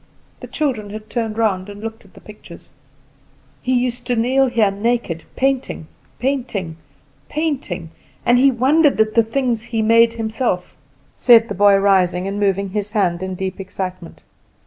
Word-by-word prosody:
The -, -, -9 dB
children 250 Hz, -9 st, -2 dB
had 215 Hz, +1 st, -9 dB
turned 225 Hz, -3 st, -2 dB
round 205 Hz, -4 st, 0 dB
and 205 Hz, 0 st, -9 dB
looked 225 Hz, +1 st, -7 dB
at 195 Hz, -, -22 dB
the -, -, -14 dB
pictures. 210 Hz, 0 st, -14 dB, 0.9 s
"He 255 Hz, 0 st, +1 dB
used 245 Hz, 0 st, -2 dB
to 245 Hz, -, +1 dB
kneel 260 Hz, +4 st, +2 dB
here 230 Hz, -5 st, +2 dB
naked, 205 Hz, -5 st, -2 dB
painting, 265 Hz, -10 st, -1 dB, 0.3 s
painting, 240 Hz, -11 st, -2 dB, 0.5 s
painting; 255 Hz, -, -3 dB, 0.3 s
and 245 Hz, +1 st, +4 dB
he 275 Hz, +2 st, +6 dB
wondered 275 Hz, +3 st, +3 dB
at 215 Hz, 0 st, +2 dB
the 230 Hz, -, +5 dB
things 235 Hz, 0 st, -1 dB
he 230 Hz, -1 st, -2 dB
made 230 Hz, +1 st, +5 dB
himself," 220 Hz, -4 st, -2 dB, 0.4 s
said 230 Hz, -2 st, +5 dB
the -, -, -2 dB
boy, 200 Hz, +1 st, +5 dB
rising 190 Hz, -2 st, +2 dB
and 200 Hz, +1 st, -3 dB
moving 200 Hz, -1 st, 0 dB
his 205 Hz, +1 st, -3 dB
hand 180 Hz, -5 st, +1 dB
in 185 Hz, 0 st, -4 dB
deep 190 Hz, +1 st, -4 dB
excitement. 185 Hz, -2 st, -7 dB
220 Hz, 160 wpm, -19 LUFS, 195-245 Hz, 0.9 s, he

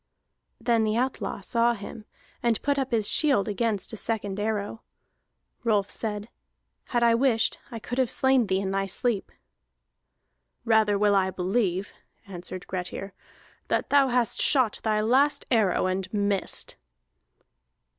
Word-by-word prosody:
Then 230 Hz, -1 st, +2 dB
the 215 Hz, +1 st, 0 dB
outlaw 235 Hz, -6 st, -2 dB
saw 235 Hz, +5 st, +1 dB
him, 210 Hz, +1 st, -9 dB, 0.4 s
and 235 Hz, -2 st, +1 dB
put 285 Hz, 0 st, +1 dB
up 265 Hz, -1 st, -1 dB
his 220 Hz, -4 st, 0 dB
shield 275 Hz, -10 st, +3 dB
against 215 Hz, -1 st, -1 dB
a -, -, -5 dB
second 205 Hz, -3 st, -2 dB
arrow. 210 Hz, 0 st, -2 dB, 0.8 s
Rolf 210 Hz, -4 st, +1 dB
said: 210 Hz, -1 st, -4 dB, 0.6 s
"Had 240 Hz, -1 st, 0 dB
I 235 Hz, -1 st, +5 dB
wished, 235 Hz, -2 st, +2 dB
I 230 Hz, -, -6 dB
could 245 Hz, +3 st, -5 dB
have 255 Hz, -3 st, +2 dB
slain 265 Hz, -4 st, +2 dB
thee 190 Hz, 0 st, +1 dB
in 195 Hz, -1 st, -2 dB
thy 195 Hz, 0 st, -1 dB
sleep." 210 Hz, +1 st, -1 dB, 1.3 s
"Rather 220 Hz, -2 st, +3 dB
will 205 Hz, 0 st, +3 dB
I 190 Hz, -1 st, +3 dB
believe," 190 Hz, 0 st, -1 dB, 0.3 s
answered 185 Hz, -1 st, -8 dB
Grettir, 185 Hz, +1 st, -5 dB, 0.5 s
"that -, -, -1 dB
thou 280 Hz, -1 st, +5 dB
hast 245 Hz, -2 st, 0 dB
shot 255 Hz, -7 st, +3 dB
thy 215 Hz, -1 st, +1 dB
last 265 Hz, +7 st, +2 dB
arrow, 215 Hz, -8 st, +2 dB
and 185 Hz, 0 st, -2 dB
missed." 200 Hz, -2 st, -1 dB
215 Hz, 140 wpm, -26 LUFS, 195-240 Hz, 1.3 s, I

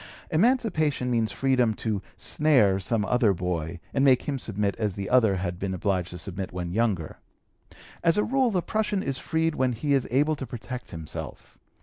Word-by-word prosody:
Emancipation 160 Hz, -, +2 dB
means 115 Hz, -3 st, +1 dB
freedom 125 Hz, -4 st, +2 dB
to 105 Hz, -3 st, -2 dB, 0.2 s
"snare" 125 Hz, -11 st, +3 dB
some 105 Hz, +2 st, 0 dB
other 120 Hz, -2 st, +3 dB
boy, 85 Hz, -2 st, -3 dB
and 135 Hz, -, +2 dB
make 130 Hz, -3 st, +5 dB
him 140 Hz, -2 st, -2 dB
submit 105 Hz, -3 st, -2 dB
as 105 Hz, -4 st, -1 dB
the 100 Hz, -1 st, -4 dB
other 115 Hz, -6 st, +4 dB
had 90 Hz, -1 st, -3 dB
been 95 Hz, -1 st, -2 dB
obliged 90 Hz, -2 st, -1 dB
to 90 Hz, -, -7 dB
submit 95 Hz, +3 st, -4 dB
when 90 Hz, -1 st, -4 dB
younger. 100 Hz, -6 st, -1 dB, 0.8 s
As 165 Hz, +2 st, +3 dB
a 210 Hz, -, +3 dB
rule, 265 Hz, 0 st, +2 dB
the 185 Hz, -5 st, 0 dB
prushun 210 Hz, -3 st, -1 dB
is 135 Hz, -1 st, -2 dB
freed 160 Hz, 0 st, 0 dB
when 130 Hz, -3 st, +1 dB
he 140 Hz, +5 st, 0 dB
is 135 Hz, -2 st, +1 dB
able 145 Hz, +5 st, +2 dB
to 135 Hz, -, -6 dB
protect 125 Hz, +1 st, -7 dB
himself. 80 Hz, -3 st, -8 dB
120 Hz, 185 wpm, -26 LUFS, 95-145 Hz, 0.8 s, make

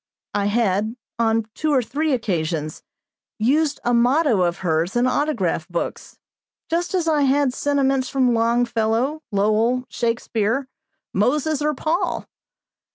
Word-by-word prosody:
I 205 Hz, -1 st, 0 dB
had, 215 Hz, 0 st, +1 dB, 0.2 s
on 225 Hz, -1 st, +2 dB
two 310 Hz, -1 st, -1 dB
or 265 Hz, -3 st, +3 dB
three 295 Hz, +7 st, -1 dB
occasions, 165 Hz, -, -2 dB, 0.6 s
used 285 Hz, +6 st, +1 dB
a 245 Hz, -, +2 dB
motto 245 Hz, -, +3 dB
of 175 Hz, 0 st, +1 dB
hers 165 Hz, +3 st, 0 dB
in 240 Hz, +1 st, +3 dB
autograph 245 Hz, -, 0 dB
books, 175 Hz, -2 st, -5 dB, 0.5 s
just 345 Hz, +3 st, 0 dB
as 345 Hz, -3 st, 0 dB
I 305 Hz, -2 st, +2 dB
had 275 Hz, -1 st, +2 dB
sentiments 270 Hz, -2 st, +1 dB
from 255 Hz, -3 st, +2 dB
Longfellow, 235 Hz, +4 st, +1 dB
Lowell, 215 Hz, +5 st, +1 dB
Shakespeare, 230 Hz, +1 st, -1 dB, 0.5 s
Moses, 295 Hz, +8 st, +1 dB
or 300 Hz, 0 st, 0 dB
Paul. 320 Hz, +7 st, -1 dB
245 Hz, 125 wpm, -22 LUFS, 215-285 Hz, 0.6 s, or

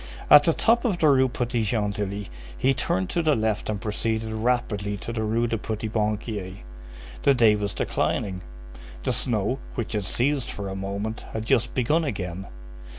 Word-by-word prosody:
At 145 Hz, 0 st, +10 dB
the 165 Hz, -, +4 dB
top 235 Hz, +6 st, +3 dB
of 210 Hz, -7 st, +1 dB
the 160 Hz, -, +3 dB
Rue 130 Hz, -2 st, +5 dB
Petit 120 Hz, -1 st, -1 dB
Gentilly 105 Hz, -2 st, -1 dB, 0.3 s
he 135 Hz, -, +3 dB
turned 95 Hz, -7 st, -1 dB
to 170 Hz, -, +1 dB
the 155 Hz, -3 st, +3 dB
left 110 Hz, -2 st, -1 dB
and 105 Hz, -2 st, -1 dB
proceeded 110 Hz, +1 st, -2 dB
rapidly 110 Hz, -3 st, 0 dB
to 115 Hz, -, -6 dB
the 110 Hz, -, -2 dB
Rue 110 Hz, +2 st, +1 dB
du 115 Hz, -2 st, -1 dB
Petit 110 Hz, 0 st, -3 dB
Banquier. 105 Hz, -3 st, -2 dB, 0.6 s
The 140 Hz, -, +4 dB
day 115 Hz, -4 st, +5 dB
was 100 Hz, -1 st, -3 dB
declining; 95 Hz, -2 st, -1 dB, 0.6 s
the -, -, +1 dB
snow, 115 Hz, +2 st, 0 dB, 0.2 s
which 115 Hz, -3 st, -3 dB
had 105 Hz, -3 st, -1 dB
ceased 130 Hz, +6 st, 0 dB
for 100 Hz, -1 st, -5 dB
a 95 Hz, -, -4 dB
moment, 100 Hz, +3 st, -4 dB
had 110 Hz, 0 st, -3 dB
just 120 Hz, +1 st, +1 dB
begun 150 Hz, +7 st, +2 dB
again. 95 Hz, -, -4 dB
110 Hz, 175 wpm, -25 LUFS, 105-125 Hz, 0.6 s, At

